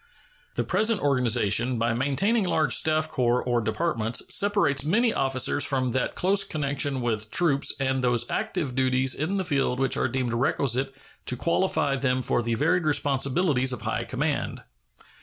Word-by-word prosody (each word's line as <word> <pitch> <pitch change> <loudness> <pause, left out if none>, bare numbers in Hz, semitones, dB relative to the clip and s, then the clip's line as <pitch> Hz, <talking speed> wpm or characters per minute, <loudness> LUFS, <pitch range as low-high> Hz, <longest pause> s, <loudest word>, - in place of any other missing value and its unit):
The - - 0
present 220 -1 +1
organization, 125 -3 +1
by 115 0 0
maintaining 190 - +1
large 160 -3 +1
staff 155 0 +2
corps 125 -3 0
or 120 -1 0
departments, 115 0 -1
separates 200 -10 +2
many 220 +9 +2
officers 135 +1 0
from 130 -2 0
that 130 +1 -2
close 195 +2 +2
connection 140 -2 -2
with 110 -3 -2
troops 145 -3 +2
and 130 -1 -1
those 120 -1 +1
active 180 - -3
duties 130 0 +1
in 165 +7 -2
the 190 - -1
field 135 -6 0
which 135 -1 +1
are - - +1
deemed 125 -1 -2
requisite 135 +2 0 0.4
to 125 - 0
qualify 170 -2 0
them 130 -1 0
for 120 - 0
the 115 0 -1
varied 165 +7 +1
responsibilities 140 -1 +1
of 125 - -7
high - - -2
command. - - -3
135 Hz, 160 wpm, -25 LUFS, 125-155 Hz, 0.4 s, staff